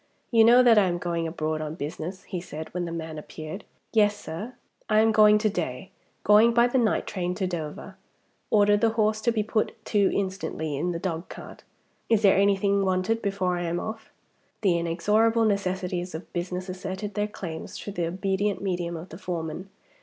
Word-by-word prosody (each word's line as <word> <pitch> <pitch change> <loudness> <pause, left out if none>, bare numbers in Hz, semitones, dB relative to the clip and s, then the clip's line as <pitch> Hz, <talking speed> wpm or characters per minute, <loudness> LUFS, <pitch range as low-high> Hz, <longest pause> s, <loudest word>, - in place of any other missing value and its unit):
"You 225 -2 +6
know 240 +3 +7
that 230 -3 +7
I 195 - +3
am 175 -1 -1
going 170 -1 -2
abroad 155 -1 -2
on 155 0 -4
business?" 170 +5 -6
he 180 -3 -5
said, 155 -2 -8
when 180 0 -2
the 170 - -5
man 160 -2 -5
appeared. 155 +6 -8 0.3
"Yes, 210 -2 +3
sir." 210 +11 -7 0.3
"I 215 0 +4
am 220 0 +4
going 210 -1 +6
to 215 +1 +1
day 175 -5 -3 0.3
going 220 +3 +5
by 235 0 +6
the 245 +2 +2
night 225 -3 +1
train 180 -2 -3
to 190 - -1
Dover. 175 +2 -5 0.5
Order 205 -1 +4
the 225 +2 +3
horse 215 0 +2
to 235 - +2
be 220 -2 0
put 215 0 -1
to 205 -2 +2
instantly 185 -6 -2
in 175 +6 -1
the 170 - -3
dogcart. 170 -1 -6 0.5
Is 225 -2 +3
there 195 - +6
anything 200 0 +3
wanted 190 +4 0
before 190 -3 -1
I 175 - -2
am 170 +1 -1
off?" 220 +2 -6 0.5
The 180 -5 +3
inexorable 210 +7 +2
necessities 185 -4 -1
of 160 - -9
business 180 +1 -3
asserted 190 +2 -5
their 205 +1 0
claims 175 -6 -7
through 205 - -7
the 175 -3 -1
obedient 190 +2 -1
medium 175 -3 -2
of 170 +3 -9
the 165 - -10
foreman. 175 0 -5
190 Hz, 190 wpm, -26 LUFS, 170-210 Hz, 0.5 s, know